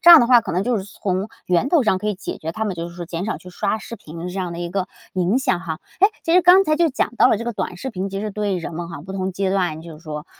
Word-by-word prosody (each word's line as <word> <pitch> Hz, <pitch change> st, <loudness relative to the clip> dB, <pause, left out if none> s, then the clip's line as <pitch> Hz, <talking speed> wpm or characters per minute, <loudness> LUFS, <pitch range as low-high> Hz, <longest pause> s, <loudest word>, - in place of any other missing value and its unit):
这 345 Hz, -1 st, +8 dB
样 335 Hz, -, +12 dB
的 240 Hz, -, +3 dB
话 245 Hz, -1 st, +7 dB
可 -, -, -5 dB
能 180 Hz, +3 st, +1 dB
就 240 Hz, -1 st, +1 dB
是 190 Hz, -, -5 dB
从 195 Hz, -1 st, -3 dB, 0.2 s
源 180 Hz, +9 st, +2 dB
头 320 Hz, -3 st, +4 dB
上 200 Hz, -5 st, +2 dB
可 210 Hz, -, -5 dB
以 210 Hz, -, +1 dB
解 205 Hz, -, -6 dB
决 160 Hz, -, -4 dB
他 220 Hz, +6 st, -3 dB
们， 200 Hz, -3 st, -2 dB
就 170 Hz, 0 st, -4 dB
是 170 Hz, -, -12 dB
说 175 Hz, -, -5 dB
减 170 Hz, +3 st, -4 dB
少 220 Hz, -, -1 dB
去 180 Hz, -, -12 dB
刷 180 Hz, -, -1 dB
视 230 Hz, -, -8 dB
频 160 Hz, -4 st, -12 dB
的 170 Hz, -, -6 dB
这 195 Hz, -, -5 dB
样 180 Hz, -2 st, -2 dB
的 170 Hz, -, -6 dB
一 175 Hz, 0 st, -4 dB
个 190 Hz, -1 st, -2 dB, 0.2 s
影 185 Hz, +6 st, +2 dB
响 190 Hz, -9 st, +1 dB
哈。 160 Hz, -4 st, -5 dB, 0.2 s
诶， 395 Hz, -, +8 dB, 0.2 s
其 330 Hz, -, 0 dB
实 360 Hz, -, +7 dB
刚 365 Hz, +3 st, +7 dB
才 310 Hz, -1 st, +2 dB
就 335 Hz, +1 st, +4 dB
讲 260 Hz, -3 st, -1 dB
到 -, -, +6 dB
了 220 Hz, -, +3 dB
这 230 Hz, -, -5 dB
个 240 Hz, -, -2 dB
短 185 Hz, -3 st, -4 dB
视 265 Hz, +8 st, -5 dB
频， 195 Hz, -1 st, -3 dB
其 195 Hz, +1 st, -4 dB
实 215 Hz, 0 st, -3 dB
对 205 Hz, -2 st, -1 dB
人 165 Hz, -1 st, -5 dB
们 170 Hz, 0 st, -5 dB
哈， 165 Hz, -4 st, -8 dB
不 190 Hz, +2 st, -8 dB
同 190 Hz, 0 st, -2 dB
阶 190 Hz, +1 st, -1 dB
段， 180 Hz, -5 st, 0 dB
就 160 Hz, -2 st, -10 dB
是 -, -, -19 dB
说 150 Hz, -1 st, -6 dB
190 Hz, 365 characters per minute, -21 LUFS, 175-230 Hz, 0.2 s, 样